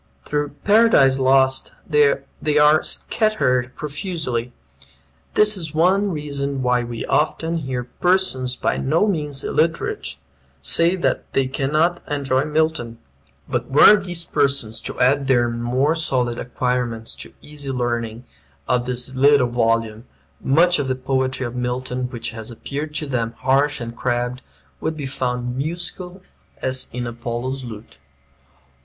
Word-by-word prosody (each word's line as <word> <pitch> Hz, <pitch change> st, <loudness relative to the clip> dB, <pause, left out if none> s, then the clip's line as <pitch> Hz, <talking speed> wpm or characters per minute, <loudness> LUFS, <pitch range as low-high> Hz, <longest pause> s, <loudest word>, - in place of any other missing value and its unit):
Through 145 Hz, -1 st, -2 dB
"Paradise 205 Hz, -12 st, +5 dB
Lost" 130 Hz, 0 st, +3 dB
they 150 Hz, -3 st, +5 dB, 0.5 s
are 150 Hz, +1 st, +6 dB
scattered 130 Hz, -, 0 dB
profusely. 145 Hz, -6 st, -3 dB, 0.8 s
This 210 Hz, 0 st, +4 dB
is 160 Hz, -5 st, -5 dB
one 190 Hz, +5 st, +3 dB
reason 140 Hz, -4 st, -3 dB
why 125 Hz, -1 st, +2 dB
we 120 Hz, -1 st, -5 dB
often 160 Hz, +2 st, 0 dB
hear 130 Hz, -5 st, -3 dB
persons 130 Hz, -3 st, 0 dB
by -, -, -1 dB
no 155 Hz, +9 st, +2 dB
means 150 Hz, -8 st, -2 dB
illiterate 155 Hz, -, -1 dB, 0.4 s
say 165 Hz, -, +4 dB
that 180 Hz, -, -1 dB
they 135 Hz, -, +2 dB
cannot 155 Hz, +6 st, 0 dB
enjoy 140 Hz, -2 st, 0 dB
Milton. 155 Hz, -6 st, -1 dB, 0.5 s
But -, -, -2 dB
were 145 Hz, +9 st, +8 dB
these 180 Hz, -4 st, -3 dB
persons 140 Hz, -7 st, 0 dB
to -, -, -6 dB
add 135 Hz, +3 st, +4 dB
to 140 Hz, -, -6 dB
their 120 Hz, -1 st, +2 dB
more 125 Hz, +6 st, +1 dB
solid 125 Hz, -7 st, 0 dB
acquirements 125 Hz, -2 st, -2 dB
the -, -, -9 dB
easy 145 Hz, -2 st, -8 dB
learning 120 Hz, -2 st, -2 dB, 0.4 s
of 125 Hz, 0 st, +1 dB
this 125 Hz, +1 st, -3 dB
little 135 Hz, -1 st, +4 dB
volume, 115 Hz, -1 st, 0 dB, 0.4 s
much 175 Hz, +6 st, +4 dB
of 140 Hz, -, -1 dB
the 130 Hz, -, 0 dB
poetry 130 Hz, 0 st, -1 dB
of 120 Hz, -, -5 dB
Milton 125 Hz, 0 st, -2 dB
which 120 Hz, -3 st, -5 dB
has 110 Hz, 0 st, -7 dB
appeared 145 Hz, +6 st, -6 dB
to 155 Hz, -, -1 dB
them 120 Hz, -4 st, -2 dB
"harsh 140 Hz, +3 st, +2 dB
and 120 Hz, -1 st, -6 dB
crabbed" 120 Hz, +1 st, -2 dB, 0.4 s
would 160 Hz, 0 st, -3 dB
be 145 Hz, -, -4 dB
found 125 Hz, -2 st, -3 dB
"musical 175 Hz, +5 st, -5 dB, 0.4 s
as 130 Hz, 0 st, 0 dB
is 125 Hz, 0 st, -4 dB
Apollo's 120 Hz, +3 st, -4 dB
lute." 110 Hz, -, -10 dB
130 Hz, 135 wpm, -21 LUFS, 125-155 Hz, 0.8 s, were